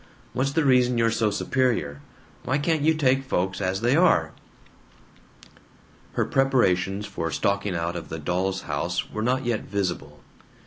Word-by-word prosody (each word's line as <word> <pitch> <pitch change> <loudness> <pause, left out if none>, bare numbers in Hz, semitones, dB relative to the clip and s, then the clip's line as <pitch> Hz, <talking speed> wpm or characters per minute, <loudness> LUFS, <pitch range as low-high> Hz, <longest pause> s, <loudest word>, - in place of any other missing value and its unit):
What's 135 +2 -1
the 160 0 +1
reason 125 -2 +4
you're 115 0 +3
so 110 -1 +1
superior? 110 - -1 0.4
Why 130 +3 0
can't 155 +1 0
you 160 +2 +3
take 135 -3 +2
folks 95 -6 -2
as 95 +1 -1
they 120 +3 +3
are?" 160 - +3 1.8
Her - - 0
preparations 105 -7 +1
for 80 -5 -4
stalking 100 +3 -1
out 85 +1 -2
of 85 -2 -6
the 80 - -5
Doll's 90 +4 -2
House 85 +4 -3
were 110 - -4
not 130 +3 0
yet 120 -3 0
visible. 85 -7 -4
105 Hz, 150 wpm, -25 LUFS, 90-130 Hz, 1.8 s, reason